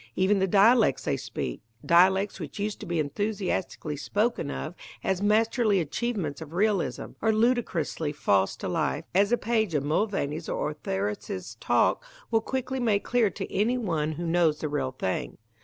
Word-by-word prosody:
Even 195 +2 +3
the 190 - +2
dialects 210 - +4
they - - 0
speak - - -5 0.2
dialects 190 +4 +4
which 155 -6 -7
used 210 0 -3
to - - -8
be 170 0 -1
enthusiastically 185 -1 -2
spoken 210 - -1
of 155 - -4 0.3
as 190 -1 0
masterly 215 0 +3
achievements 170 -3 -2
of 160 0 -9
realism 200 0 0
are 220 - +3
ludicrously 215 - 0
false 100 -9 +1
to - - -5
life, 65 - -1
as 200 +4 +3
a 240 - +4
page 220 -7 0
of 145 - +1
Mulvaney's 160 -1 -1
or 150 - -1
Ortheris's 105 -5 -4
talk - - +2 0.3
will 225 -1 +3
quickly 260 +2 -3
make 215 -5 +1
clear 240 -4 +2
to 195 0 -7
any 230 +5 +2
one 160 -9 -1
who 170 +3 -5
knows 165 -2 +2
the 155 - -3
real 135 -3 -2
thing. 95 -7 -3
190 Hz, 165 wpm, -27 LUFS, 150-220 Hz, 0.3 s, dialects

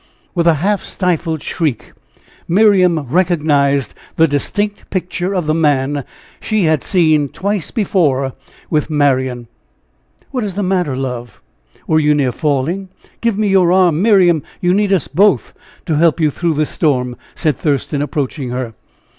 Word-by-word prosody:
With 170 -2 +1
a 165 - +5
half 195 +7 0
stifled 165 -4 -2
shriek, 155 -9 -3 0.5
Miriam 185 -3 +4
recognized 145 - +1 0.2
the 160 - +4
distinct 205 +8 -2
picture 180 +1 -2
of 180 -3 -1
the 155 - +1
man 145 -3 +1 0.3
she 215 -3 0
had 155 -4 +1
seen 155 -6 +2
twice 200 0 -3
before 145 - 0 0.3
with 155 -1 -1
Marian. 130 -5 +1 0.9
"What 255 -4 -2
is 200 -3 -4
the 205 - -1
matter, 180 -7 0
love? 125 -4 -5 0.5
Were 155 - +2
you 150 -1 +3
near 135 -4 +1
falling? 155 +8 -1 0.3
Give 230 -3 0
me 210 -1 +1
your 185 -3 +4
arm, 180 -3 +3
Miriam 185 -7 +4 0.2
you 180 0 +2
need 205 0 +1
us 185 -7 +1
both 195 +7 +2 0.3
to 155 -3 0
help 165 +1 +3
you 155 -2 +2
through 170 +2 -1
this 155 0 -1
storm," 125 -6 0 0.2
said 155 -3 0
Thurston, 145 -1 -1
approaching 145 -2 -3
her. 125 -2 -4
160 Hz, 150 wpm, -16 LUFS, 140-185 Hz, 0.9 s, a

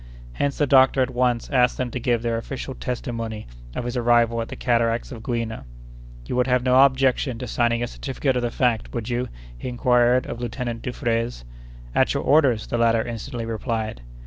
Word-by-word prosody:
Hence 140 - -1
the 145 - +3
doctor 135 -1 +5
at 130 - -3
once 125 -1 +1
asked 125 -3 +3
them 125 -2 -2
to 125 - -3
give 120 -1 0
their 115 -1 0
official 130 +2 -6
testimony 115 -4 -4 0.3
of 120 - -3
his 120 +1 -3
arrival 120 -1 +3
at 115 - -4
the - - -7
cataracts 115 +1 0
of 115 -3 -8
Gouina. 115 -2 -3 0.6
"You - - -4
would 125 0 +2
have 125 -1 +2
no 130 +1 +6
objection 130 -2 +1
to 125 - -5
signing 120 0 +1
a - - -1
certificate 135 +1 -2
of 125 - +1
the 120 - 0
fact, 120 -2 0
would 115 0 -3
you?" 125 +1 -1 0.3
he - - -6
inquired 125 0 +3
of 120 - -6
Lieutenant 120 -1 -4
Dufraisse. 115 - -2 0.5
"At - - +2
your - - -1
orders!" 135 -8 +3
the 120 - -2
latter 115 -1 +3
instantly 115 0 -5
replied. 110 - -3
120 Hz, 195 wpm, -23 LUFS, 115-125 Hz, 0.6 s, no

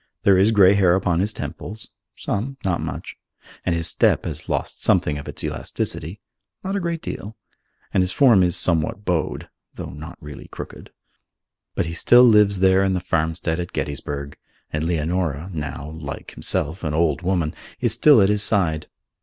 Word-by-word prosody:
There 100 - +5
is 100 +4 +4
grey 100 -3 +6
hair 95 -3 +4
upon 90 -3 +1
his 100 +3 0
temples 110 0 -7 0.3
(some, 130 +7 -3
not 90 -3 0
much), - - -6 0.5
and 85 - 0
his 85 0 -2
step - - +2
has - - -6
lost - - -3
something 75 -1 +2
of 70 - -10
its - - -5
elasticity 85 +7 -3 0.4
(not 195 +1 -3
a - - 0
great 170 -2 -3
deal), 105 +2 -7 0.6
and - - +3
his 90 0 0
form 120 -4 +5
is 90 -2 +3
somewhat 85 +4 +1
bowed 85 -3 -1 0.3
(though - - -7
not 75 +3 -9
really 75 -1 -10
crooked). - - -9 0.9
But - - 0
he 80 - -5
still 120 +8 +6
lives 105 -5 +5
there 95 0 +4
in 95 -1 +1
the - - 0
farmstead 80 -1 -1
at 85 - -5
Gettysburg, 70 0 -4 0.4
and 75 +1 -1
Leonora, 85 0 -1
now, 75 -1 -5
like 70 -3 -7
himself, 80 +6 -2
an 75 -2 -2
old 85 +1 +1
woman, 90 -3 0 0.3
is 120 -3 +3
still 135 +1 +6
at 95 - +3
his 105 0 +1
side. 85 -8 0
90 Hz, 175 wpm, -22 LUFS, 80-100 Hz, 0.9 s, grey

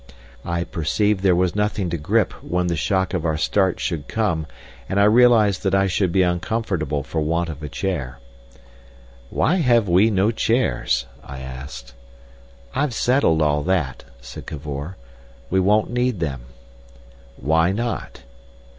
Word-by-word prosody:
I 85 0 -2
perceived 95 +6 0
there 95 -2 +4
was 90 +1 +1
nothing 105 -3 -1
to 85 - -1
grip 75 - +1
when 90 +2 -1
the 85 -1 0
shock 95 +3 0
of 90 -4 -1
our 80 -2 0
start 95 +3 +1
should 80 -4 -3
come, 90 -9 -1 0.4
and 100 - +1
I - - +5
realised 110 -3 +5
that 95 -2 +1
I 95 0 +3
should 95 -1 0
be 95 +1 +3
uncomfortable 90 -5 -1
for 80 +3 -3
want 85 +2 0
of 75 -2 -7
a 75 - -5
chair. 70 -8 -3 1.1
"Why 180 - +1
have 120 - +3
we 95 +5 +4
no 100 +1 +2
chairs?" 65 - 0 0.2
I 65 -1 -9
asked. 65 -1 -9 0.8
"I've 140 -5 -1
settled 115 - +2
all 75 -1 +2
that," 85 -9 -1 0.2
said - - -10
Cavor. 75 +3 -6 0.5
"We 95 - +3
won't 105 +4 +2
need 125 -4 0
them." 70 -7 -3 0.9
"Why 80 +5 +2
not?" 115 - -4
90 Hz, 150 wpm, -22 LUFS, 75-105 Hz, 1.1 s, I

